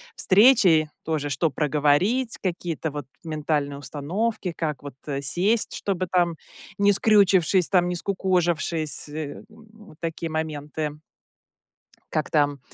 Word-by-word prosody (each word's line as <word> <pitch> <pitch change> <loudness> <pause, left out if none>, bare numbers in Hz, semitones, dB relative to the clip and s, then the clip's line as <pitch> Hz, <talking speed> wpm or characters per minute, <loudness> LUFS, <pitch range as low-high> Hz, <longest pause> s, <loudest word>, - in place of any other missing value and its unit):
встречей 190 - +5
тоже, 155 -2 -2
что 150 +4 +1
проговорить, 150 - +1
какие-то 170 -4 -3
вот 145 -2 -6 0.2
ментальные 150 -3 -2
установки, 175 - -3
как 150 -4 -3
вот, 140 -3 -8
э, 140 -1 -2
сесть, 185 - +1
чтобы 185 -2 -2
там 175 -2 +2 0.4
не 200 0 +4
скрючившись 195 -4 +4
там, 180 -2 +3
не 180 - -2
скукожившись, 175 -5 -1
м. 150 -1 -6
Вот 220 -5 -17
такие 165 0 -4
моменты. 155 -1 -3 1.2
Как 155 - -1
там 145 -3 +1
165 Hz, 120 wpm, -24 LUFS, 150-190 Hz, 1.2 s, встречей